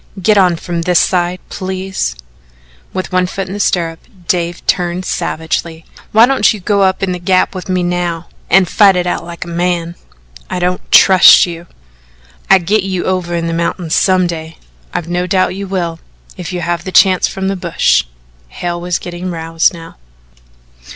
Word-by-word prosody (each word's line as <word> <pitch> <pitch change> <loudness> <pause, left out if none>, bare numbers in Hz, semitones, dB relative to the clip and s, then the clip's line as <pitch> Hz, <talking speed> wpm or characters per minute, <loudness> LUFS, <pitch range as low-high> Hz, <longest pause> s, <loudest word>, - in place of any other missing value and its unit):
"Get 210 +3 +3
on 185 -3 +4
from 170 0 -4
this 175 0 +2
side, 180 0 0
please." 190 - -4 0.8
With 185 0 -4
one 185 0 +1
foot 195 +1 -4
in 190 - -6
the 205 - -5
stirrup, 165 -4 0 0.3
Dave 175 -1 -2
turned 180 0 -1
savagely: 160 0 -3 0.3
"Why 220 +2 +6
don't 270 +2 +3
you 215 - -5
go 200 +2 0
up 190 0 +1
in 190 - 0
the 180 - -3
Gap 185 +2 +1
with 185 -1 -7
me 185 -1 0
now 175 -1 -2 0.2
an' 190 +1 +5
fight 195 +2 +4
it 180 -1 0
out 175 - -2
like 170 +1 -8
a - - -12
man?" 170 0 -2 0.6
"I - - -3
don't 180 0 -2
trust 190 -2 +7
you." 170 -1 -8 0.8
"I'll 195 - +7
git 195 +4 +1
ye 190 -1 -3
over 180 -2 -2
in 170 0 -2
the 165 - -2
mountains 170 0 -2
some 185 -1 +3
day." 160 -2 -6 0.3
"I've 175 -2 -4
no 175 +1 -2
doubt 185 -1 +1
you 200 0 -5
will, 170 -3 -3 0.4
if 180 -1 -7
you 180 -1 -4
have 170 0 -2
the 185 - -6
chance 185 -1 +4
from 190 0 -4
the 195 - -1
bush." 175 - +1 0.4
Hale 175 - -5
was 175 0 -1
getting 175 +1 -6
roused 165 -1 0
now. 165 -1 -12
180 Hz, 185 wpm, -14 LUFS, 170-185 Hz, 0.8 s, trust